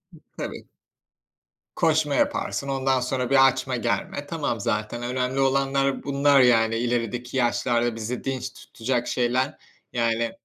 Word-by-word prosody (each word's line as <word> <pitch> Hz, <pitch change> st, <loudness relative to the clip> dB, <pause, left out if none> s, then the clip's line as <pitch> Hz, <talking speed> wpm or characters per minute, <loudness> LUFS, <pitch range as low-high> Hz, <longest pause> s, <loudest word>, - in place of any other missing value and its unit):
I -, -, -14 dB, 0.2 s
tabii. -, -, -6 dB, 1.1 s
Koşma 155 Hz, -3 st, +2 dB
yaparsın, 140 Hz, -, 0 dB
ondan 135 Hz, -1 st, +1 dB
sonra 125 Hz, 0 st, -2 dB
bir 135 Hz, -1 st, +7 dB
açma 135 Hz, -, -1 dB
germe. -, -, -2 dB
Tamam, -, -, -2 dB
zaten 110 Hz, +3 st, -2 dB
önemli 125 Hz, +2 st, -1 dB
olanlar 135 Hz, 0 st, +1 dB
bunlar, 140 Hz, 0 st, +4 dB
yani, 115 Hz, -2 st, +4 dB
ilerideki 120 Hz, +1 st, -2 dB
yaşlarda 120 Hz, -1 st, +1 dB
bizi 115 Hz, +2 st, -4 dB
dinç 130 Hz, -1 st, -3 dB
tutacak 120 Hz, +1 st, -3 dB
şeyler. 130 Hz, +4 st, 0 dB, 0.4 s
Yani 115 Hz, -1 st, 0 dB
125 Hz, 125 wpm, -24 LUFS, 120-135 Hz, 1.1 s, bir